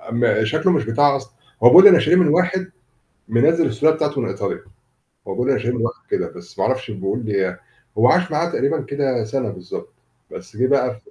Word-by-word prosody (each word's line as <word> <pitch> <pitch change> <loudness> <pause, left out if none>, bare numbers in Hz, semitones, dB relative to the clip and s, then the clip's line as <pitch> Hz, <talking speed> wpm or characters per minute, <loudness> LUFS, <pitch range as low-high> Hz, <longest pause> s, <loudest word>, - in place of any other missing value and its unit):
أ - - -12
ما 120 -2 +1
شكله 155 - +1
مش 150 -9 0
بتاع 140 +5 +2
أصل 135 0 -10 0.3
هو 120 - +8
بيقول 185 +10 +9
أنا 180 -4 +6
شاريه 180 - +2
من 180 -4 +4
واحد 185 +3 0 0.6
منزِّل 160 +8 +2
السلالة 150 +7 +1
بتاعته 150 -3 -2
من - - -3
إيطاليا. - - -5 0.7
هو - - -4
بيقول 125 +2 -1
أنا 135 - +1
شاريه 120 +1 -3
من 115 - -3
واحد 120 - -9
كده، 405 0 -1
بس - - -15
ما - - 0
اعرفش 130 -3 -2
بيقول 100 +4 -4
لي 95 -3 -2 0.4
هو 120 +3 +5
عاش 180 +5 +2
معاه 165 +3 -1
تقريبًا 140 +3 -1
كده 135 -5 -2
سَنة 125 +4 -3
بالضبط. 90 -2 -9 0.4
بس - - -11
جه 130 - +1
بقى 130 -2 +1
في 210 - -24
135 Hz, 215 wpm, -19 LUFS, 120-160 Hz, 0.7 s, بيقول